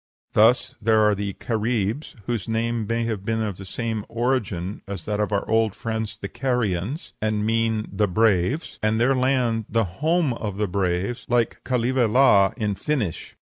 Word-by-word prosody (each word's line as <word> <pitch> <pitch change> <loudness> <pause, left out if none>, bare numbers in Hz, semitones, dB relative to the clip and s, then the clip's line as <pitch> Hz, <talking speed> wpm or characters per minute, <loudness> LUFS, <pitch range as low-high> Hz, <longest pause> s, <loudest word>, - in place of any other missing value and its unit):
Thus 115 +4 +4
there 110 0 +4
are 105 0 +4
the 100 0 -3
Caribs, 115 +4 -2
whose 115 -3 -3
name 115 -1 -1
may 115 +1 0
have 110 -4 -3
the 105 -3 -2
same 110 +1 -3
origin 115 -6 -1
as 100 -4 -6
that 105 -1 -2
of 105 0 0
our 100 -1 0
old 110 -1 +2
friends 110 -1 -4
the 100 - -5
Carians, 125 - -2
and 105 -1 0
mean 110 -1 +1
the 105 +1 +2
Braves, 110 - +1
and 110 +1 +1
their 125 +3 +4
land 125 -4 +1
the 115 0 +2
home 150 - +1
of 105 -4 -5
the 105 0 0
Braves, 95 +4 -1
like 120 -2 +1
Kaleva 125 0 +1
la, 105 -6 +5
in 105 -4 0
Finnish. 115 - -3
110 Hz, 165 wpm, -24 LUFS, 105-120 Hz, -, la